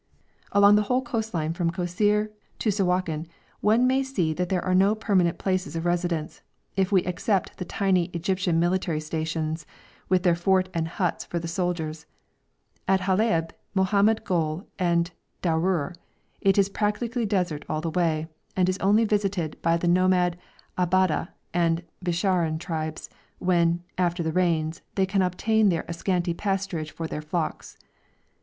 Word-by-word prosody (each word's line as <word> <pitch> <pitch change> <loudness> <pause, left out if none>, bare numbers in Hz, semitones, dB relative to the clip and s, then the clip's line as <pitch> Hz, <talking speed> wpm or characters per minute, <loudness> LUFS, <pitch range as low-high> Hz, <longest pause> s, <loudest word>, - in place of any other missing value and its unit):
Along 200 +1 +6
the - - +4
whole 255 +1 +2
coast 225 -3 -3
line 160 -2 -1
from 170 0 0
Kosseir 205 +5 +1 0.3
to 215 - +1
Sawakin 180 -5 0 0.3
one 225 +4 +3
may 260 +1 +3
say 200 -13 -1
that 180 +2 -2
there 185 -2 0
are 185 - +1
no 195 +3 +4
permanent 190 -6 +1
places 185 -4 -1
of 165 +1 -3
residence, 175 -2 -1 0.3
if 190 0 +1
we 190 -3 +4
except 185 +2 -1
the 180 - -3
tiny 190 -2 +1
Egyptian 175 0 0
military 175 -2 +1
stations, 160 0 -3 0.5
with 185 -1 +3
their 175 -3 +4
fort 185 +2 +2
and 165 -1 -1
huts 175 +1 -2
for 175 - -4
the 170 0 -3
soldiers, 165 -3 -3 0.8
at 190 0 +3
Halaib, 185 -3 +1 0.2
Mohammed 200 +3 +3
Gol, 165 -3 -1
and 170 -1 +1 0.3
Darour; 170 0 +1 0.5
it 195 0 +3
is 200 -1 +5
practically 220 +3 -1
desert 180 -7 -1
all 155 - -1
the 165 0 -2
way, 160 -2 0 0.3
and 185 -1 +3
is 185 +1 0
only 210 +4 +4
visited 200 -6 -1
by 165 0 +3
the 175 - -1
nomad 180 0 +3 0.4
Ababdeh 180 -2 +2 0.3
and 170 0 +1 0.2
Bisharin 175 -2 +1
tribes, 160 -1 -4 0.3
when, 175 -1 +2 0.2
after 175 -1 +1
the 160 -1 -1
rains, 165 -3 +1
they 190 - +3
can 195 +1 +1
obtain 210 +4 +2
there 170 -3 0
a 170 - -4
scanty 175 0 0
pasturage 195 -4 -2
for 165 - -6
their 150 - -4
flocks. 155 +1 -4
180 Hz, 155 wpm, -26 LUFS, 165-195 Hz, 0.8 s, Along